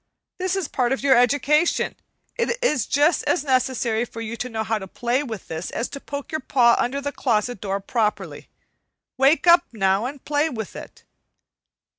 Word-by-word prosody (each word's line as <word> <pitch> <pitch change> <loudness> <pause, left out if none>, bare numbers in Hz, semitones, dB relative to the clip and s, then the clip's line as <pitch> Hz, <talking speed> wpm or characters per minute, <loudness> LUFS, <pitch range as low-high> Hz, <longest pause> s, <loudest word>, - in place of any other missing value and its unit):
This 370 0 0
is 385 -3 -1
a - - -8
part 250 0 +1
of 270 - -4
your 270 -2 +5
education; 285 +7 +2 0.4
it 475 0 -1
is 300 - +1
just 295 +4 +3
as 295 +2 +1
necessary 255 -4 +1
for 230 -1 -8
you 230 0 -5
to 250 +2 -5
know 220 -2 -3
how 220 +1 -1
to 190 - -8
play 240 +6 -1
with 230 -8 -7
this 160 +2 -5
as 235 - -3
to 280 - -7
poke 285 0 -7
your 310 - -2
paw 240 -3 +4
under 265 +3 0
the 285 0 -3
closet 235 -4 -1
door 195 -1 -2
properly. 215 +1 -2 0.7
Wake 275 +6 +4
up, 345 0 +6
now, 195 0 +1
and 280 0 -9
play 295 +2 +1
with 220 -7 -6
it." - - -11
255 Hz, 190 wpm, -23 LUFS, 225-290 Hz, 0.7 s, up